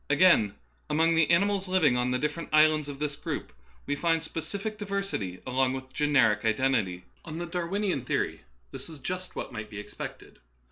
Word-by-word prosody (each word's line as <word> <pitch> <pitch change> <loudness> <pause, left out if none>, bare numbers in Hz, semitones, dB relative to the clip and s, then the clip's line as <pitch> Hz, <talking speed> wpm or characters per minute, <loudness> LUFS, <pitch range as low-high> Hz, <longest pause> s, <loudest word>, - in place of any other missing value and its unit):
Again, 145 - +5 0.3
among 160 +2 +3
the 165 -2 +3
ani 170 +4 +5
mals 200 -2 -1
living 180 -9 +4
on 125 0 +1
the 125 - +1
different 150 +4 -3
islands 155 -1 +4
of 140 - -6
this 150 0 -2
group, - - -5 0.3
we 145 - 0
find 165 +2 +1
specific 200 +7 -4
diversity 195 - -3
along 130 0 +1
with 130 0 -7
generic 140 -8 +3
iden 115 +4 +2
tity. 90 -6 -1 0.2
On 160 0 -6
the 175 - -3
Darwinian 175 - -1
theory - - -1 0.3
this - - -5
is 160 - -7
just 185 +5 -5
what - - -4
might 110 -2 -6
be 105 - -8
expected. 105 - -8
150 Hz, 185 wpm, -28 LUFS, 130-175 Hz, 0.3 s, Again